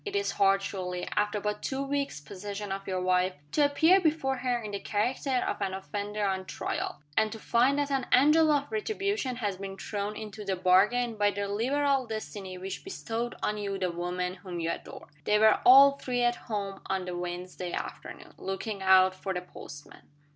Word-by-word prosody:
It 410 -2 -5
is 405 0 +1
hard, 195 0 +3
surely, 180 -2 -4
after 210 0 +1
but 210 0 -3
two 270 0 -2
weeks' 280 - -2
possession 200 +7 -7
of 195 0 -4
your 185 -1 -1
wife, 185 0 +2 0.2
to 300 - +3
appear 320 +6 +5
before 300 -5 +1
her 250 -1 0
in 215 -3 -6
the 200 - -3
character 245 +5 0
of - - -3
an 190 -1 -1
offender 205 +2 -3
on 190 -1 -1
trial 155 - -4
and 220 -1 +2
to 225 - -6
find 245 +5 +2
that 285 -1 0
an 270 -2 0
angel 300 +5 +6
of 285 -1 0
retribution 405 - -1
has 205 -6 -2
been 195 0 -7
thrown 205 +1 -4
into 215 0 -7
the 195 -1 -1
bargain 210 +6 +3
by 205 0 +3
the 200 0 -3
liberal 265 +5 +1
destiny 205 -4 -6
which 190 +1 -6
bestowed 240 -10 -4
on 210 0 0
you 200 -1 -3
the 185 -2 -1
woman 180 +1 -3
whom 180 -2 -7
you 165 0 -1
adore! - - -8 0.2
They 210 - +4
were 220 0 +5
all 275 +2 +8
three 245 -1 -1
at 240 0 +3
home 200 -4 -5
on 190 -1 -1
the 180 -1 -4
Wednesday 180 0 -5
afternoon, - - -7
looking 195 +2 -4
out 190 0 +6
for 190 0 -4
the 180 - -2
postman. 145 -4 -12
210 Hz, 195 wpm, -29 LUFS, 190-255 Hz, 0.2 s, all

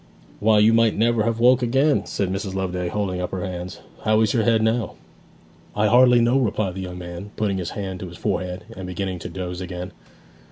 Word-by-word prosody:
'Why, 110 +1 +4
you 105 +2 +5
might 115 -2 +3
never 115 0 +2
have 115 -1 -1
woke 125 +2 +5
again!' 135 +5 +2
said 95 -2 -2
Mrs. 95 0 -4
Loveday, 90 -2 -2
holding 95 -1 -2
up 90 - -2
her 95 0 -4
hands. 90 -1 -6 0.2
'How 110 0 +3
is 110 - +2
your 115 - +2
head 110 -1 +2
now?' 110 0 0 0.8
'I 105 - +2
hardly 125 +1 +6
know,' 120 +3 +3
replied 110 -6 0
the 95 - -6
young 90 -1 -6
man, 85 +3 -7
putting 100 -3 -1
his 85 - -3
hand 95 -2 -4
to 95 - -6
his 85 0 -11
forehead 90 0 -2
and 95 -1 -7
beginning 90 0 -4
to - - -7
doze 90 -1 -5
again. 90 0 -6
100 Hz, 210 wpm, -23 LUFS, 90-115 Hz, 0.8 s, hardly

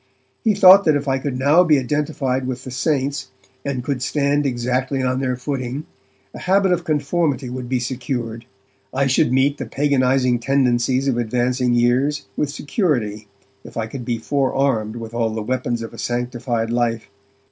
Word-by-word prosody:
He 220 -4 +3
thought 195 0 +8
that 155 - +4
if 145 0 -2
I 135 0 +1
could 130 -2 -3
now 145 +7 +5
be 155 -4 +4
identified 135 -1 -1
with 130 0 -4
the 130 - -7
'saints', 140 +1 -1 0.3
and 135 -3 -3
could 135 -1 -2
stand 145 +1 +1
on - - +2
exactly 125 +2 -1
their 130 0 0
footing, 130 +2 -4 0.5
a - - -8
habit 190 0 +2
of 175 -1 +1
conformity 145 -4 0
would 125 -1 -6
be 130 -1 +1
secured. 120 -2 -4 0.5
I 135 +1 +1
should 135 0 +2
meet 135 +2 +2
the - - -4
paganizing 130 -3 +2
tendencies 130 0 +1
of 130 -3 +1
advancing 125 +1 0
years 125 +5 +1
with 150 - -1
security 125 - -1 0.4
if - - -11
I 115 - -1
could 125 +3 -7
be 120 0 -2
forearmed 130 -3 0
with 115 -1 -7
all 115 -1 0
the 110 0 -4
weapons 120 0 -2
of 115 - -8
a - - -10
sanctified 120 -1 -2
life. 120 -2 0
130 Hz, 170 wpm, -20 LUFS, 120-140 Hz, 0.5 s, thought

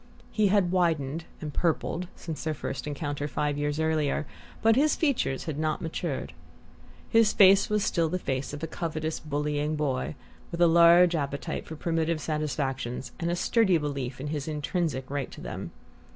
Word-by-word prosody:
He 215 -2 +3
had 195 -3 +3
widened 165 -4 0 0.2
and 150 -2 -5
purpled 170 +2 0
since 160 -3 -6
their 155 -1 -1
first 135 - -5
encounter, 145 0 -3
five 150 0 -1
years 145 +1 -1
earlier, 155 -1 +1 0.4
but 225 0 +5
his 295 +4 +3
features 270 - 0
had 155 -2 -4
not 155 -1 0
matured. 155 - -4 0.7
His 225 -2 +4
face 195 0 +6
was 210 -1 +1
still 165 -2 +1
the 185 - -1
face 135 -6 -3
of 145 +2 -7
a - - -1
covetous 160 -1 -3
bullying 150 0 -1
boy, 145 -1 -1 0.3
with 170 - -6
a 175 - +6
large 170 +1 +7
appetite 145 +1 -3
for 160 - -6
primitive 165 0 0
satisfactions 135 -5 -2
and 170 - -1
a 175 - +1
sturdy 190 0 +3
belief 140 -4 -4
in 145 +2 -4
his 150 -1 -3
intrinsic 150 -3 -2
right 140 -2 -3
to - - -11
them. - - -6
155 Hz, 170 wpm, -28 LUFS, 145-170 Hz, 0.7 s, large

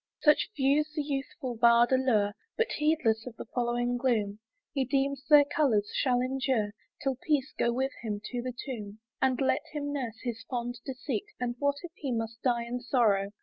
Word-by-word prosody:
Such 300 +4 +5
views 285 +3 +2
the 300 - 0
youthful 275 -2 -4
bard 235 +1 +5
allure, 235 -6 +3 0.2
But, 460 0 +1
heedless 295 -8 +1
of 240 - -7
the - - -7
following 240 0 0
gloom, 220 -5 0 0.3
He 275 - +1
deems 275 +1 0
their 295 -1 +8
colours 275 -9 +1
shall 250 -2 +2
endure 255 -4 0 0.3
'Till 270 -2 0
peace 300 -5 0
go 235 - +2
with 265 +3 0
him 210 -3 -3
to 245 -1 -2
the 250 0 -5
tomb. 215 -6 -6 0.2
And 260 -1 +2
let 270 +1 +2
him 290 -1 -3
nurse 245 -6 -3
his 235 -2 -3
fond 245 -1 -3
deceit, 270 +8 -3
And 240 -1 -1
what 285 0 +2
if 350 - -7
he 275 -4 -3
must 225 -1 -3
die 240 -2 +1
in 245 +1 -3
sorrow! 215 -6 +2
255 Hz, 185 wpm, -29 LUFS, 235-280 Hz, 0.3 s, their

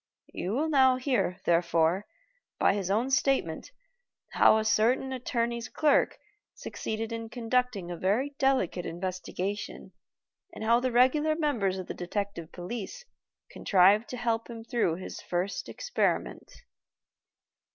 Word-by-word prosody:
You 185 +4 -3
will 295 +6 0
now 265 -4 +5
hear, 255 -8 -1
therefore, 170 +2 +2 0.5
by - - +3
his 195 -2 -3
own 230 +7 +1
statement, 270 - 0 0.6
how - - +5
a 220 - -1
certain 245 +5 +2
attorney's 235 -1 -2
clerk 300 -2 +2 0.4
succeeded 220 +1 -5
in 230 -1 -5
conducting 240 -6 -1
a 175 - -5
very 215 +11 0
delicate 260 -10 +1
investigation, 185 +3 -5 0.6
and - - -6
how 230 +2 +4
the 255 0 -1
regular 295 +6 +3
members 240 - 0
of 185 - -5
the - - -6
Detective 180 -2 -4
Police 225 - -6 0.5
contrived 200 +4 +4
to 250 - -5
help 230 -1 -1
him 230 -1 -8
through 225 -9 0
his 185 - -8
first 180 +3 -3
experiment." - - -2
225 Hz, 130 wpm, -28 LUFS, 185-255 Hz, 0.6 s, now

